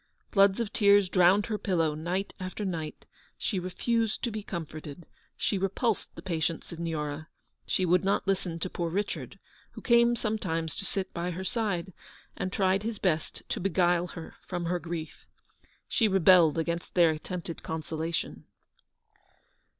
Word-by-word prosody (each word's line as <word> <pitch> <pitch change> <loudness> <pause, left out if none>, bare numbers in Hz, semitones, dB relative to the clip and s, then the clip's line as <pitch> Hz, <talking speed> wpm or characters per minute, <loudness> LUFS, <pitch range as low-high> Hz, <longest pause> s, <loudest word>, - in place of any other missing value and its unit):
Floods 195 +1 +5
of 225 -3 -2
tears 200 -2 +5
drowned 185 +2 +5
her 215 -2 -2
pillow 165 -6 +1
night 175 +6 -2
after 185 +3 -4
night; 160 -5 -4 0.3
she 195 - -1
refused 225 +5 -1
to 235 - 0
be 215 0 -4
comforted; 160 -3 -7 0.3
she 200 - 0
repulsed 200 +4 0
the - - -9
patient 165 -3 -1
Signora; 155 -2 -4 0.4
she 185 - +1
would 180 0 +3
not 195 +1 +1
listen 185 -3 0
to 165 - -2
poor 170 -2 -2
Richard, 200 +4 -3 0.4
who - - -9
came 235 0 +5
sometimes 180 -9 -2
to 200 - -5
sit 190 0 -3
by 175 +1 -2
her 180 +2 -4
side, 190 -4 -1 0.4
and 185 - -3
tried 190 0 +2
his 220 0 -3
best 165 -6 -1
to - - -1
beguile 175 -1 +2
her 165 -2 -9
from 175 -2 -3
her 175 +1 0
grief. 165 -2 -6 0.6
She 225 - +3
rebelled 180 -5 +6
against 170 +1 -2
their 170 -3 +6
at 155 0 -5
tempted 175 -2 -5
consolation. 160 +1 -3
180 Hz, 155 wpm, -29 LUFS, 165-200 Hz, 0.6 s, rebelled